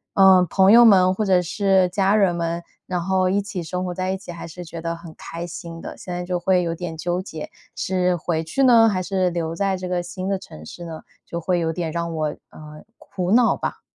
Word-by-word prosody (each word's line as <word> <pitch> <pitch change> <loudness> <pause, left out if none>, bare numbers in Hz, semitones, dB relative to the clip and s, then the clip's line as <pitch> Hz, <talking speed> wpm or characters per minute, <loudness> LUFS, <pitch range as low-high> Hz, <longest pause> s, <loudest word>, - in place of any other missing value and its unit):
呃， 190 -2 +7
朋 190 0 +5
友 235 +2 +9
们 185 -5 +6
或 215 - -2
者 185 -2 +3
是 190 +1 +2
家 195 +2 +2
人 195 -5 +3
们， 170 0 -2 0.2
然 180 -1 -1
后 185 0 +1
一 195 +2 +2
起 200 -2 -5
生 180 +2 -4
活 180 - -3
在 185 +1 -3
一 190 - -1
起 190 -2 -10
还 170 -1 -8
是 175 +2 -9
觉 165 0 -8
得 165 0 -3
很 165 -1 -11
开 170 +1 -7
心 170 -1 -8
的。 - - -8
现 180 - -9
在 175 0 -3
就 180 0 -2
会 180 0 +2
有 165 -1 -2
点 170 -1 -6
纠 175 +2 -2
结， 160 -5 -8 0.2
是 180 -1 0
回 165 -1 -2
去 215 +12 -1
呢？ 230 -3 +6
还 185 -3 -1
是 185 -1 0
留 165 -2 -3
在 195 +2 0
这 185 0 -5
个 180 -1 -1
新 185 +2 -6
的 195 -1 -1
城 75 - -12
市 175 - -9
呢？ 160 -1 -7 0.2
就 170 - -5
会 175 +1 0
有 165 -1 0
点 165 -1 -3
让 170 0 -3
我， 155 -1 0 0.2
呃 150 0 -12
苦 180 -1 -4
恼 235 +2 +4
吧。 - - -4
180 Hz, 260 characters per minute, -22 LUFS, 170-190 Hz, 0.2 s, 友